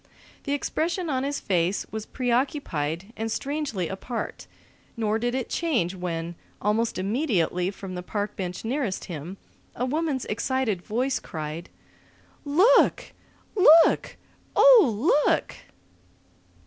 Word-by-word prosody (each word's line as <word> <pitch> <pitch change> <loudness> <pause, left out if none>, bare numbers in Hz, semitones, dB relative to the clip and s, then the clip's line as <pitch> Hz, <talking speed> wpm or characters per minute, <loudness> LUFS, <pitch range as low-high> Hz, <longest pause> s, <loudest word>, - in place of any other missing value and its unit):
The 285 - -1
expression 335 +4 -1
on 260 -1 0
his 285 +1 -2
face 180 0 0
was 220 -1 -5
preoccupied 235 - -1
and 225 0 -3
strangely 280 - -2
apart, 225 +6 -5 0.5
nor 220 -1 0
did 240 +2 -1
it 260 -2 -2
change 245 - 0
when, 170 -2 -4 0.3
almost 215 +3 0
immediately 190 - 0
from 195 -1 -8
the 180 - -4
park 205 +3 -4
bench 180 +2 -5
nearest 245 -5 -2
him, 170 +3 -7 0.4
a 245 - -1
woman's 295 -1 -1
excited 225 -3 -1
voice 250 +8 -1
cried: 155 +2 -6 0.8
"Look! 425 +11 +4 0.4
Look! 330 -4 +6 0.4
Oh, 300 - +6
look!" - - +1
225 Hz, 115 wpm, -25 LUFS, 185-285 Hz, 0.8 s, Look